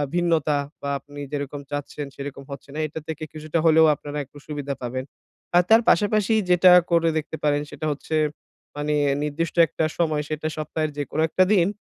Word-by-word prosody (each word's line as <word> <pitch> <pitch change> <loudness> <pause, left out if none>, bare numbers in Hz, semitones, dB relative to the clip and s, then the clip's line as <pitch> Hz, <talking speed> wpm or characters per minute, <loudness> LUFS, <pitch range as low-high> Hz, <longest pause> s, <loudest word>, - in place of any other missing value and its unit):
ভিন্নতা 165 -4 +2 0.2
বা 140 - -3
আপনি 145 +2 -12
যেরকম 145 -1 -4
চাচ্ছেন 145 0 -4
সেরকম 140 0 -7
হচ্ছে 140 +1 -9
না 155 - -4
এটা 155 +2 -7
থেকে 160 -1 -5
কিছুটা 155 +1 -2
হলেও 160 0 +6
আপনারা 145 0 -7
একটু 145 - -17
সুবিধা 145 -2 -4
পাবেন। 130 +2 -3 0.5
আর 175 - +6
তার 225 +1 +7
পাশাপাশি 210 +1 +3 0.2
যেটা 180 +1 +6 0.2
করে 165 -1 +4
দেখতে 155 +1 -4
পারেন। 145 -1 +2
সেটা 145 +1 -6
হচ্ছে 150 +2 -4 0.6
মানে 150 +1 -1 0.3
নির্দিষ্ট 155 +3 -2
একটা 155 - -1
সময় 155 -3 +1
সেটা 155 0 -3
সপ্তাহের 155 0 -2
যেকোনো 145 +2 -2
একটা 185 - +4
দিন, 180 -4 +4
150 Hz, 175 wpm, -24 LUFS, 145-165 Hz, 0.6 s, তার